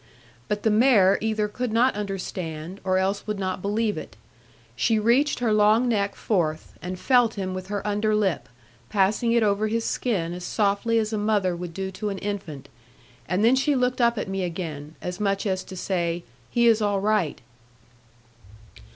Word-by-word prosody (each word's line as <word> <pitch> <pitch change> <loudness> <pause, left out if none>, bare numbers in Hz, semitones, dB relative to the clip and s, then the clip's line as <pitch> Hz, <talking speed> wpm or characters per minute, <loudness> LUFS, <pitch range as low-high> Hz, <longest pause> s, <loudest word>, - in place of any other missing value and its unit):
But 205 0 -2
the 220 - +3
mare 210 -4 +5
either 215 -1 0
could 245 +3 -3
not 240 +4 +3
understand, 185 -4 -5
or 185 -1 +1
else 195 +2 -1
would 210 -1 -2
not 185 -1 -3
believe 210 +2 0
it. - - -11 0.6
She 225 - +2
reached 240 +7 +3
her 235 -3 +1
long 215 +3 +4
neck 200 -4 0
forth, 160 -7 -1
and 180 +1 -5
felt 245 0 +3
him 190 -2 -3
with 185 0 -6
her 205 0 -4
under 210 +1 +1
lip, 195 -6 0 0.4
passing 210 +4 +2
it 235 -1 +3
over 210 +1 +1
his 225 +1 -1
skin 180 -9 -1
as 180 0 -7
softly 205 +4 +1
as 220 0 0
a 215 - 0
mother 205 -4 +1
would 170 -1 -7
do 190 0 -3
to 210 +2 -4
an 195 - -4
infant; 190 -9 -5 0.6
and 190 +4 +2
then 240 +3 +5
she 280 +2 +2
looked 250 0 +1
up 235 0 +3
at - - -2
me 190 0 -2
again; 160 -4 -5
as 180 0 -4
much 200 -1 0
as 190 -2 -1
to 190 - -9
say, 175 -2 -1 0.3
'he 235 0 +2
is 225 -2 +5
all 205 -1 +1
right.' 205 -6 0
205 Hz, 185 wpm, -25 LUFS, 185-220 Hz, 0.6 s, mare